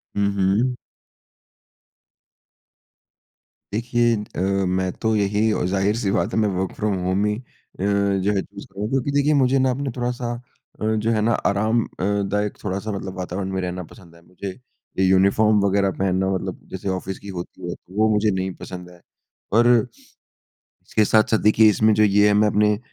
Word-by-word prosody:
हुँ, 100 0 +2
हुँ। 100 +6 +1 3.0
देखिए, 120 +1 +1 0.2
अ, - - -3 0.3
मैं 95 0 0
तो 110 -1 +1
यही 105 +2 +1
और 105 - 0
ज़ाहिर-सी 100 +3 0
बात 110 - 0
है - - +1
मैं 105 -1 +2
वर्क़ 95 -1 -2
फ्रॉम 105 -1 -1
होम 95 +3 +1
ही 105 0 0 0.4
अ, - - -2
जो 100 -1 +1
है 100 - +1
चूज़ - - -11
करूँगा। 100 +2 -5
क्योंकि 135 +1 0
देखिए 145 +1 +2
मुझे 130 0 +3
ना 130 0 +2
अपना 135 +1 -3
थोड़ा-सा 120 -1 -2 0.5
अ, - - -3 0.2
जो 115 - +2
है 110 -2 +1
ना 115 +2 +2 0.2
आराम 110 +4 +1
अ, - - -11 0.2
दायक 100 +1 -1
थोड़ा-सा 100 +2 -3
मतलब 95 -2 -6
वातावरण 95 +1 -4
में 95 - -1
रहना 90 0 -4
पसंद 85 -3 -16
है। 85 - -18
मुझे 90 +2 -8 0.5
ये 95 - +4
यूनिफ़ॉर्म 100 +3 +4
वग़ैरह 100 0 +2
पहनना 95 0 +1
मतलब 95 - -4
जैसे 95 +1 -4
ऑफ़िस 95 0 -4
की - - -13
होती 85 - -8
है। - - -4
तो 90 - -20
वो 110 +1 +4
मुझे 105 0 +2
नहीं 95 0 -2
पसंद 90 -1 -8
है। 90 - -16 0.5
पर 115 +3 +4 1.0
इसके 110 - -2
साथ-साथ 110 +1 +3
देखिए 105 +1 +5
इसमें 110 +1 +3
जो 105 - +3
ये 105 0 +4
है - - +3
मैं 105 +1 +4
अपने 105 0 +2
100 Hz, 180 wpm, -22 LUFS, 95-110 Hz, 3.0 s, देखिए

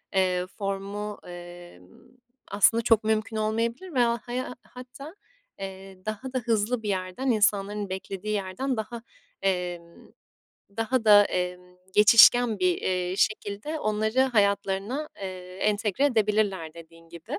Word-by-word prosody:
eee, 185 -1 +1
formu, 200 +1 -5
emm, 175 - -11 0.6
aslında 225 +3 +4
çok 225 -2 +4
mümkün 220 0 -1
olmayabilir 230 +10 -2
veya 235 -2 +2
haya 250 +1 -4
hatta, 255 +6 -11 0.4
eee, 190 0 -9
daha 220 +5 -5
da 255 - 0
hızlı 225 0 0
bir 210 - -3
yerden, 190 +7 -2
insanların 205 -2 +1
beklediği 190 +2 -5
yerden 205 +7 -2
daha, 225 +2 -5 0.4
emm, 175 -3 -3 0.7
daha 225 +1 0
da, 205 -1 +8
emm, 180 0 -4 0.2
geçişken 225 +1 +7
bir, 180 -1 +2
eee, 180 0 -1
şekilde 215 +9 -1
onları 215 +3 0
hayatlarına, 205 +3 +1
eee, 185 -1 -7
entegre 210 +4 +1
edebilirler 210 - +1
dediğin 165 0 -15
gibi. 170 -1 -7
205 Hz, 120 wpm, -26 LUFS, 185-230 Hz, 0.7 s, da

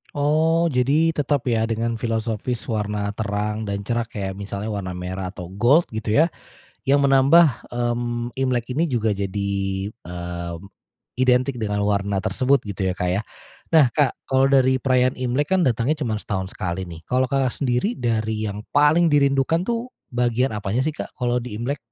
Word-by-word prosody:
Oh, 160 +3 +2
jadi 140 +6 +3
tetap 145 -3 0
ya, 115 -1 +1
dengan 115 0 -2
filosofis 115 +1 -2
warna 105 -1 -1
terang 105 +1 -3
dan 100 0 -3
cerah, 120 +1 -1
kayak 95 -1 -4
misalnya 100 +2 -4
warna 95 -3 -4
merah 90 +1 -4
atau 90 -1 -8
gold 120 - +4
gitu 110 -1 -2
ya, 160 +3 +4 0.6
yang 140 +1 +4
menambah, 140 +1 +5
mmm, 120 0 -1
Imlek 125 -2 0
ini 160 +7 +1
juga 115 -6 0
jadi, 100 0 -2 0.4
eee, 85 -4 -6 0.6
identik 130 0 +2
dengan 105 -2 -1
warna 100 -1 0
tersebut 135 +5 +2
gitu 100 -2 -3
ya, 90 - 0
Kak, 90 -1 -1
ya. 100 +4 0 0.5
Nah, 145 -6 +6
Kak, 140 0 +2 0.2
kalau 135 0 +4
dari 130 -1 +4
perayaan 130 -1 +2
Imlek 130 +4 -1
kan 175 - +2
datangnya 125 +5 +1
cuman 110 -2 -1
setahun 95 -1 -4
sekali 90 +1 -3
nih. 85 -2 -10
Kalau 130 +1 +2
Kakak 130 -1 0
sendiri, 140 - 0
dari 110 -2 -1
yang 105 +1 -5
paling 150 +3 +4
dirindukan 140 +4 +2
tuh, 235 +1 -2 0.2
bagian 120 0 +1
apanya 105 +5 -1
sih, 155 - 0
Kak? - - -6
Kalau 125 -1 0
di 110 -4 -6
Imlek. 140 +5 -2
120 Hz, 165 wpm, -22 LUFS, 105-135 Hz, 0.6 s, Nah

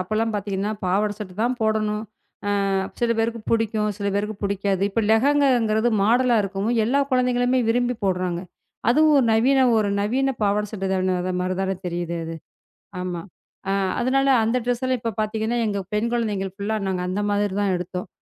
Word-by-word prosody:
அப்போ 185 +3 -5
எல்லாம் 225 +1 +1
பார்த்தீங்கன்னா, 200 0 -2
பாவாடை 205 +3 +1
சட்டை 195 -4 -7
தான் 245 +2 +1
போடவேண்டும். 215 -1 0 0.7
அ - - 0 0.3
சில 235 -1 +2
பேருக்குப் 225 0 -1
பிடிக்கும், 220 -2 +1
சில 200 - -2
பேருக்குப் 210 0 -3
பிடிக்காது. 200 -1 0
இப்ப 225 +3 0
லெஹங்கா 280 +5 +4
என்கிறது 220 0 +1
மாடல் 240 +4 +3
ஆக - - +4
இருக்கவும் 195 +4 -1
எல்லா 265 +5 +2
குழந்தைகளுமே 250 0 +2
விரும்பிப் 245 0 0
போடுகிறார்கள். 180 -2 -1 0.4
அதுவும் 305 +5 +5
ஒரு 265 - +3
நவீன 260 +5 +3 0.2
ஒரு 210 -2 +1
நவீன 265 +6 +1
பாவாடை 210 +1 +1
சட்டை 195 -3 -3
தானே, 185 0 +1
அது 185 +1 -2
மாதிரி 185 +1 -1
தானே 195 0 -1
தெரியுது 170 -1 -3
அது. 165 0 -5 0.7
ஆமா. 180 -2 -4 0.5
அ - - +2 0.3
அதனால 270 +2 +2 0.2
அந்த 230 +3 +1
ட்ரெஸ் 245 0 -1
எல்லாம் 255 -1 0
இப்போ 230 -1 -2
பார்த்தீங்கன்னா, 220 +2 -1
எங்க 200 -1 -1
பெண் 215 +3 +1
குழந்தைகள் 205 -5 -1
ஃபுல்லா 210 +2 -2
நாங்கள் 180 -1 -2
அந்த 195 +3 -1
மாதிரி 205 -1 0
தான் 200 -2 +1
எடுத்தோம். 180 +1 -5
215 Hz, 180 wpm, -23 LUFS, 195-240 Hz, 0.7 s, அதுவும்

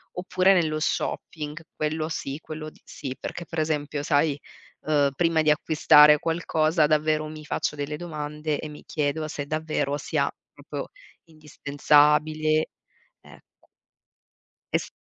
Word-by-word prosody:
Oppure 185 +1 +2
nello 155 -4 +2
shopping, 150 -2 -3 0.2
quello 155 +1 -2
sì, 140 -3 -4
quello 155 0 -7
sì, 130 -2 -7
perché 175 - -6
per 165 - -5
esempio 150 -2 -1
sai, 145 0 +2 0.4
uhm, 145 -2 +2
prima 165 -2 +2
di 155 -1 +4
acquistare 150 -1 +6
qualcosa, 160 -1 +1
davvero 155 0 +1
mi 155 -1 -9
faccio 150 - -2
delle 145 +1 -3
domande, 150 -2 -4
e 155 - -5
mi 150 0 -11
chiedo 155 +1 -1
se 145 -2 -4
davvero 155 -2 -1
sia - - -1 0.2
proprio - - -7 0.4
indispensabile, 155 +1 +2 0.5
ecco. - - -20 1.1
Esp - - 0
155 Hz, 125 wpm, -25 LUFS, 150-155 Hz, 1.1 s, acquistare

